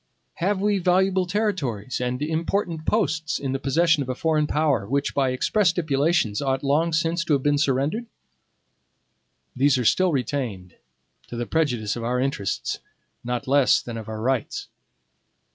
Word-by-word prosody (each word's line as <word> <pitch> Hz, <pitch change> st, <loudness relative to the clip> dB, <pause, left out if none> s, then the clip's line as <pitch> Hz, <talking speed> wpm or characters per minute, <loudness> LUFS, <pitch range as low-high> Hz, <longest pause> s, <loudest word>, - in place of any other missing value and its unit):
Have 190 Hz, +3 st, 0 dB
we 205 Hz, 0 st, +1 dB
valuable 185 Hz, +1 st, +2 dB
territories 160 Hz, -, -2 dB
and 125 Hz, 0 st, -2 dB
important 165 Hz, +1 st, -2 dB
posts 160 Hz, -7 st, 0 dB
in 135 Hz, -2 st, -3 dB
the 135 Hz, -, -2 dB
possession 160 Hz, +3 st, +2 dB
of 130 Hz, -, -4 dB
a 130 Hz, -, -1 dB
foreign 155 Hz, 0 st, +1 dB
power 145 Hz, -10 st, +1 dB
which, 140 Hz, +4 st, -1 dB
by 135 Hz, -2 st, +1 dB
express 180 Hz, +10 st, +2 dB
stipulations, 155 Hz, -, +1 dB
ought 135 Hz, -1 st, -1 dB
long 150 Hz, +4 st, +2 dB
since 165 Hz, +1 st, 0 dB
to 155 Hz, -, +1 dB
have 135 Hz, -2 st, +1 dB
been 145 Hz, 0 st, +2 dB
surrendered? 145 Hz, -, 0 dB, 1.5 s
These 135 Hz, +1 st, +3 dB
are 125 Hz, -, -1 dB
still 185 Hz, +9 st, +3 dB
retained, 120 Hz, -, -3 dB, 0.5 s
to -, -, -8 dB
the 120 Hz, 0 st, -2 dB
prejudice 120 Hz, -9 st, 0 dB
of 120 Hz, -, -5 dB
our 125 Hz, +2 st, 0 dB
interests, 130 Hz, -7 st, -2 dB, 0.4 s
not 125 Hz, +2 st, -3 dB
less 140 Hz, -1 st, +4 dB
than 120 Hz, -, -7 dB
of 110 Hz, -1 st, -7 dB
our 110 Hz, 0 st, -5 dB
rights. 130 Hz, -1 st, -2 dB
145 Hz, 160 wpm, -24 LUFS, 125-165 Hz, 1.5 s, less